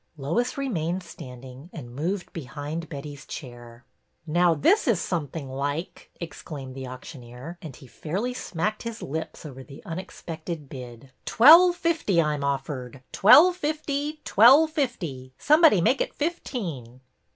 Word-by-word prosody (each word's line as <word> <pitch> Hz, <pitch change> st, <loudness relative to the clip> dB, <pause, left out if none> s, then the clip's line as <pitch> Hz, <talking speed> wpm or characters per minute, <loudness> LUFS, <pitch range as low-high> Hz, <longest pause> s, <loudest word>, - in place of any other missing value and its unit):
Lois 170 Hz, -, -1 dB
remained 185 Hz, -, -2 dB
standing, 130 Hz, -2 st, -11 dB
and 120 Hz, -7 st, -9 dB
moved 175 Hz, +8 st, -3 dB
behind 150 Hz, +2 st, -6 dB
Betty's 145 Hz, -1 st, -8 dB
chair. 120 Hz, -3 st, -10 dB, 0.2 s
" -, -, -47 dB
Now 170 Hz, +1 st, +3 dB
this 370 Hz, -, +3 dB
is 225 Hz, -8 st, +3 dB
something 160 Hz, -5 st, -4 dB
like! 145 Hz, +5 st, -4 dB
" -, -, -32 dB
exclaimed 145 Hz, -5 st, -8 dB
the 130 Hz, 0 st, -7 dB
auctioneer, 130 Hz, +4 st, -10 dB
and 155 Hz, -6 st, -9 dB
he -, -, -14 dB
fairly 190 Hz, -, -4 dB
smacked 215 Hz, -2 st, -3 dB
his 230 Hz, -1 st, -6 dB
lips 160 Hz, +3 st, -6 dB
over 135 Hz, -3 st, -9 dB
the 135 Hz, +1 st, -13 dB
unexpected 165 Hz, -3 st, -7 dB
bid. 125 Hz, 0 st, -10 dB
" -, -, -45 dB
Twelve 335 Hz, +9 st, +7 dB
fifty 325 Hz, -, 0 dB
I 150 Hz, -2 st, +2 dB
'm 145 Hz, -1 st, -4 dB
offered, 135 Hz, -2 st, -4 dB
twelve 335 Hz, -, +7 dB
fifty, 300 Hz, -1 st, -3 dB
twelve 275 Hz, +9 st, +6 dB
fifty! 170 Hz, -, -3 dB
Somebody 305 Hz, -, +5 dB
make 260 Hz, +10 st, +2 dB
it -, -, -3 dB
fifteen." 175 Hz, -, -4 dB
160 Hz, 145 wpm, -25 LUFS, -, 0.2 s, Twelve